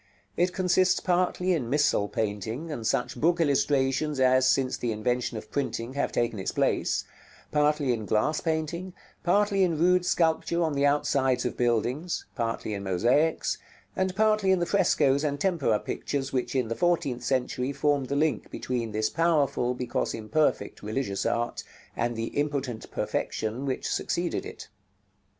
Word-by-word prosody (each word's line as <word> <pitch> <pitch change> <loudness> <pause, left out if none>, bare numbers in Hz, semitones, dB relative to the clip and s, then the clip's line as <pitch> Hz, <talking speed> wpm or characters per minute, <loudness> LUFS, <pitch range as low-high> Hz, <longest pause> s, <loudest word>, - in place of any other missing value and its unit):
It 180 +1 +2
consists 185 0 +2
partly 180 0 +1
in 130 -9 -2
missal 140 -7 +2
painting, 110 - -3
and 115 -7 -3
such 125 0 -1
book 170 +2 +3
illustrations 140 -1 +1
as, 130 0 +4
since 130 -1 +2
the 120 - -2
invention 120 +2 -1
of 110 0 -9
printing, 130 -3 -2
have 140 - -1
taken 120 -3 -1
its 95 - -2
place; - - +1 0.5
partly 150 -3 +2
in 110 -3 -4
glass 130 +9 +1
painting; 165 +3 -2 0.3
partly 200 +2 +2
in 170 -4 +1
rude 180 +2 +3
sculpture 170 0 +1
on 160 -2 0
the 140 0 +3
outsides 135 -3 +1
of 125 - -2
buildings; 125 +8 0
partly 115 -3 -2
in 100 - -4
mosaics; 120 - +1 0.4
and 185 0 -1
partly 215 -2 +3
in 190 - +5
the 175 - 0
frescoes 150 -7 +2
and 145 -2 -1
tempera 155 - +1
pictures 135 -2 -3
which, 130 +1 -1
in 130 -3 +1
the 115 - -3
fourteenth 145 -8 0
century, 130 +1 -1
formed 140 -1 +1
the 140 - -2
link 150 -5 0
between 120 -4 -3
this 110 0 0
powerful, 145 -7 +1
because 125 -1 -2
imperfect, 145 +8 0
religious 105 -3 -2
art, 120 0 -1 0.3
and 120 0 -1
the 115 0 -3
impotent 140 -6 -2
perfection 115 +6 -3
which 130 - -2
succeeded - - -2
it. - - -10
140 Hz, 155 wpm, -27 LUFS, 120-165 Hz, 0.5 s, in